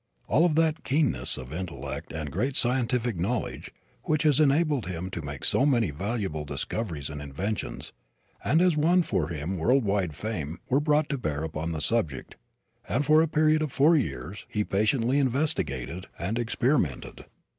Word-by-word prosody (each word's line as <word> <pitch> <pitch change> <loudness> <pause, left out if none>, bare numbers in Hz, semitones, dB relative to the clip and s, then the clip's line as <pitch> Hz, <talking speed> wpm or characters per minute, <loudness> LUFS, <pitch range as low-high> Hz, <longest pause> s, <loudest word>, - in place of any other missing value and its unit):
All 150 +10 +4
of 165 -4 +2
that 160 -1 +2
keenness 130 - 0
of 65 +2 -8
intellect 85 0 -5
and 75 -3 -4
great 130 - -1
scientific 125 -3 +1
knowledge, 105 +8 -2 0.4
which 155 0 +1
has 150 -3 +4
enabled 145 - +3
him 90 +1 -4
to 85 - -4
make 70 -2 -5
so - - +2
many 120 - +3
valuable 95 -1 -3
discoveries 80 - -4
and 75 -1 -6
inventions, 90 +10 -4 0.5
and 160 +4 +3
has 180 -3 +4
won 170 +4 +4
for 80 - 0
him 85 +3 -3
world 125 +8 +3
wide 95 -6 0
fame, 85 -7 -4
were 135 - +3
brought 150 0 +2
to 140 - -2
bear 75 -8 -2
upon 80 +1 -3
the 80 -2 -3
subject, 90 - -1 0.5
and 140 +6 +1
for 155 +2 +6
a 165 - +2
period 155 0 +3
of 155 -3 -1
four 150 +6 +5
years 105 - -3
he 105 - 0
patiently 115 +7 +1
investigated 95 - -1
and 100 +8 -2
experimented. 120 - -1
115 Hz, 165 wpm, -27 LUFS, -, 0.5 s, for